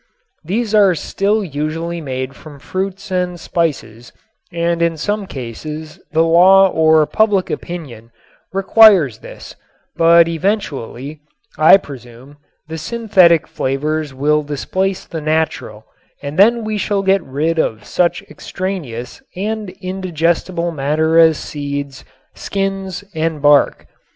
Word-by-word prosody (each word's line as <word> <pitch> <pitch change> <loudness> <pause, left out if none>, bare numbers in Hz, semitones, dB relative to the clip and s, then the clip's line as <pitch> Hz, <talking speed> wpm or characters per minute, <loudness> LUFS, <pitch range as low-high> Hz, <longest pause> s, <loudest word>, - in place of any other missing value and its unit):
These 215 +6 -2
are 200 -4 +5
still 205 +6 -1
usually 165 +2 -4
made 130 -2 -5
from 150 -2 -13
fruits 190 +6 -5
and 180 -1 -2
spices 145 -9 -3 0.4
and 170 0 -1
in 170 -1 +1
some 205 +5 -2
cases 150 +5 -8
the 160 +1 +3
law 185 +4 +6
or 160 -2 +3
public 205 0 +1
opinion 135 -11 -7 0.4
requires 195 - +5
this, - - -12 0.4
but 170 0 +5
eventually, 155 - -3 0.4
I 155 +5 +7
presume, 130 -3 -13 0.3
the 160 0 -6
synthetic 185 -3 +3
flavors 150 +3 -2
will 150 +3 +1
displace 185 +7 -3
the 160 - -6
natural 155 -8 -2 0.4
and 145 +4 -5
then 230 +3 +5
we 215 -1 -3
shall 200 -1 -1
get 195 0 +2
rid 160 +3 -2
of 110 -8 -2
such 175 -1 0
extraneous 160 -11 -6
and 210 +2 -3
indigestible 175 -1 -1
matter 155 +2 +1
as 160 -2 +5
seeds, 140 -2 -6 0.3
skins 195 -1 -4
and 160 -1 -2
bark. 145 0 +3
165 Hz, 120 wpm, -17 LUFS, 145-190 Hz, 0.4 s, I